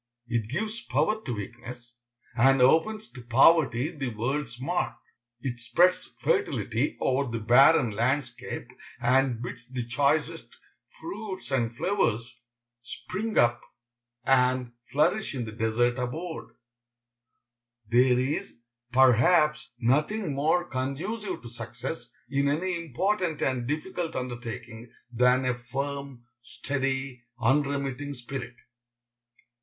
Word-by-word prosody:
It 115 Hz, -2 st, -1 dB
gives 215 Hz, -, -2 dB
power 160 Hz, -, 0 dB
to 125 Hz, -, -2 dB
weakness, 120 Hz, +3 st, -8 dB, 0.4 s
and 135 Hz, +3 st, +5 dB
opens 165 Hz, +12 st, +3 dB
to 125 Hz, -, -10 dB
poverty 135 Hz, +3 st, +4 dB
the 140 Hz, -3 st, -4 dB
world's 120 Hz, +2 st, -3 dB
mark. 175 Hz, +7 st, -1 dB, 0.5 s
It 120 Hz, -2 st, -4 dB
spreads 175 Hz, +9 st, +2 dB
fertility 330 Hz, -, 0 dB
over 135 Hz, 0 st, +1 dB
the 115 Hz, -, -2 dB
barren 120 Hz, +3 st, +5 dB
landscape, 125 Hz, +3 st, -2 dB, 0.3 s
and 125 Hz, -1 st, +2 dB
bids 120 Hz, 0 st, -7 dB
the 125 Hz, -2 st, -4 dB
choicest 145 Hz, +6 st, 0 dB, 0.4 s
fruits 220 Hz, -, -6 dB
and 120 Hz, -3 st, 0 dB
flowers 120 Hz, -, 0 dB, 0.4 s
spring 210 Hz, -, -5 dB
up 120 Hz, 0 st, +4 dB, 0.6 s
and 125 Hz, -1 st, +2 dB, 0.2 s
flourish 160 Hz, +5 st, +1 dB
in 125 Hz, -3 st, -2 dB
the 110 Hz, -, -6 dB
desert 115 Hz, +3 st, +1 dB
abode. 160 Hz, +7 st, -4 dB, 1.4 s
There 125 Hz, +2 st, +4 dB
is, 130 Hz, +4 st, -2 dB, 0.3 s
perhaps, 135 Hz, +5 st, +4 dB
nothing 150 Hz, -, +1 dB
more 160 Hz, +6 st, +1 dB
conducive 160 Hz, -, -3 dB
to 120 Hz, -, -8 dB
success 120 Hz, +3 st, -6 dB, 0.2 s
in 140 Hz, +2 st, +1 dB
any 170 Hz, +6 st, 0 dB
important 170 Hz, -, -1 dB
and 125 Hz, -3 st, 0 dB
difficult 165 Hz, +3 st, -3 dB
undertaking 120 Hz, -2 st, -6 dB, 0.2 s
than 125 Hz, +2 st, +3 dB
a 125 Hz, -, +2 dB
firm, 140 Hz, +1 st, -5 dB, 0.2 s
steady, 135 Hz, 0 st, -3 dB, 0.2 s
unremitting 140 Hz, +2 st, 0 dB
spirit. 120 Hz, -1 st, -6 dB
130 Hz, 110 wpm, -27 LUFS, 120-155 Hz, 1.4 s, and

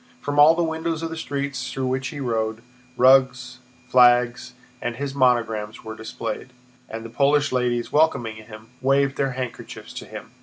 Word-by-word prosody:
From 145 Hz, 0 st, -2 dB
all 155 Hz, +3 st, +8 dB
the 170 Hz, -, +1 dB
windows 160 Hz, 0 st, -2 dB
of 165 Hz, -, -3 dB
the -, -, -4 dB
streets 140 Hz, -3 st, -4 dB
through 135 Hz, -, -3 dB
which 130 Hz, +1 st, -1 dB
he 145 Hz, -, -7 dB
rode, 110 Hz, -3 st, -2 dB, 0.3 s
rugs, 130 Hz, -1 st, +3 dB, 0.3 s
flags, 125 Hz, 0 st, +3 dB, 0.3 s
and 120 Hz, 0 st, -3 dB
his 140 Hz, +1 st, -4 dB
monogram 115 Hz, -5 st, +1 dB
were 110 Hz, -1 st, -7 dB
displayed, 110 Hz, +2 st, -6 dB, 0.4 s
and 115 Hz, 0 st, -7 dB
the -, -, -7 dB
Polish 145 Hz, +3 st, +2 dB
ladies, 125 Hz, -2 st, -1 dB
welcoming 140 Hz, -8 st, +1 dB
him, 110 Hz, 0 st, -12 dB
waved 135 Hz, +1 st, +2 dB
their 135 Hz, -2 st, -1 dB
handkerchiefs 125 Hz, -2 st, -7 dB
to -, -, -7 dB
him. -, -, -10 dB
130 Hz, 165 wpm, -23 LUFS, 120-140 Hz, 0.4 s, all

